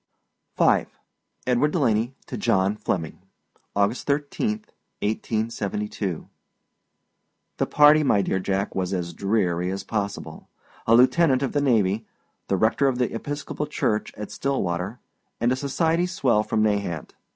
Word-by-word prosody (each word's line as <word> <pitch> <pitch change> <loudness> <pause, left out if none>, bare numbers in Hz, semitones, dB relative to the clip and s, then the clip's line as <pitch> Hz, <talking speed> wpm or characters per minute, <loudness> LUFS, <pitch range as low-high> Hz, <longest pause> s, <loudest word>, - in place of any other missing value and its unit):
V. - - +4 0.6
EDWARD 125 +4 +3
DELANEY 120 -5 +1
TO 130 - -6
JOHN 100 -2 +2
FLEMMING. 90 -7 -3 0.6
August 100 +4 +1
13, 180 +10 -1 0.4
1872. 105 -4 -2 1.3
The - - +1
party, 150 +1 +6
my 105 -9 +3
dear 95 - 0
Jack, 95 +1 -1
was 95 0 -2
as 85 -1 -3
dreary 90 -2 0
as 95 0 -4
possible. 100 -2 -4 0.4
A 115 - +6
lieutenant 130 +2 +4
of 135 - -1
the 145 - +1
navy, 110 -5 +2 0.4
the 95 - +1
rector 115 +7 +3
of 130 -2 +1
the 125 -1 0
Episcopal 145 +4 -4
Church 120 -7 -1
at 105 0 -7
Stillwater, 100 -6 -2 0.4
and 120 +2 +2
a - - +2
society 160 +6 +1
swell 130 -12 +2
from 110 0 0
Nahant. 100 -7 -1
110 Hz, 130 wpm, -24 LUFS, 100-140 Hz, 1.3 s, party